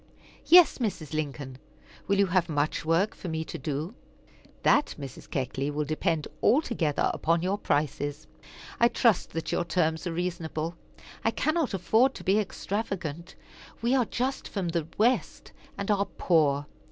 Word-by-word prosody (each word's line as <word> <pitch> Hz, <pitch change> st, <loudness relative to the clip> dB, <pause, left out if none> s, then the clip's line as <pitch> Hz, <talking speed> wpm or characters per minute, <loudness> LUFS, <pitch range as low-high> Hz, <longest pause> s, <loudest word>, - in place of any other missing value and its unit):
"Yes, 350 Hz, -4 st, +7 dB
Mrs. 180 Hz, -, -3 dB
Lincoln. 140 Hz, -4 st, -4 dB, 0.5 s
Will 200 Hz, -, +2 dB
you 200 Hz, -, +5 dB
have 180 Hz, -2 st, +1 dB
much 145 Hz, -1 st, 0 dB
work 165 Hz, +6 st, +2 dB
for -, -, -8 dB
me 160 Hz, -1 st, -2 dB
to -, -, -7 dB
do?" 155 Hz, +5 st, -3 dB, 0.7 s
"That, -, -, +3 dB
Mrs. 135 Hz, -2 st, -9 dB
Keckley, 135 Hz, +1 st, -2 dB
will 150 Hz, +1 st, -2 dB
depend 155 Hz, +1 st, -1 dB
altogether 230 Hz, -, +2 dB
upon 165 Hz, +1 st, +1 dB
your 195 Hz, +3 st, 0 dB
prices. 145 Hz, -1 st, -1 dB, 0.5 s
I 235 Hz, -, +6 dB
trust 230 Hz, -4 st, +2 dB
that 165 Hz, -, -3 dB
your -, -, +1 dB
terms 160 Hz, 0 st, 0 dB
are -, -, -2 dB
reasonable. 165 Hz, -1 st, -3 dB, 0.5 s
I -, -, +3 dB
cannot 310 Hz, -1 st, 0 dB
afford 225 Hz, +8 st, +3 dB
to -, -, -8 dB
be 195 Hz, +3 st, +3 dB
extravagant. 190 Hz, -5 st, -4 dB, 0.5 s
We 240 Hz, +2 st, +2 dB
are 255 Hz, -3 st, +3 dB
just 255 Hz, +4 st, -2 dB
from 190 Hz, -4 st, -3 dB
the 165 Hz, -2 st, -1 dB
West, 240 Hz, +4 st, +1 dB, 0.3 s
and 200 Hz, +1 st, -1 dB
are 200 Hz, -1 st, +2 dB
poor. 150 Hz, -7 st, +2 dB
170 Hz, 155 wpm, -28 LUFS, 155-205 Hz, 0.7 s, Yes